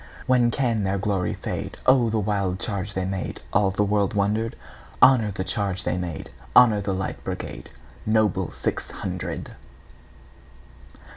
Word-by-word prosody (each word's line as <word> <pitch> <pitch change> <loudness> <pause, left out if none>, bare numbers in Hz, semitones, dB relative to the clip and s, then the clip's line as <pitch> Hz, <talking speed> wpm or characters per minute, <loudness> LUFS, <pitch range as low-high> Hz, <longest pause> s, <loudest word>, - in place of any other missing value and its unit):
When 125 -2 +4
can 115 -4 0
their 95 0 0
glory 95 -2 -1
fade?O 130 -3 +1
the 110 - 0
wild 100 -3 0
charge 100 -1 -3
they 95 -1 -1
made! 95 -1 -4
All 100 -2 +4
the 95 +2 +1
world 100 0 +1
wonder'd. 105 +3 0 0.4
Honor 130 -5 +6
the 95 -2 -3
charge 100 -2 -1
they 90 - 0
made! 90 -4 -5 0.2
Honor 110 -4 +7
the 100 - -2
Light 95 - -4
Brigade, - - -6 0.3
Noble 110 -2 +1
six - - -3
hundred! - - -5
100 Hz, 140 wpm, -24 LUFS, 95-110 Hz, 0.4 s, Honor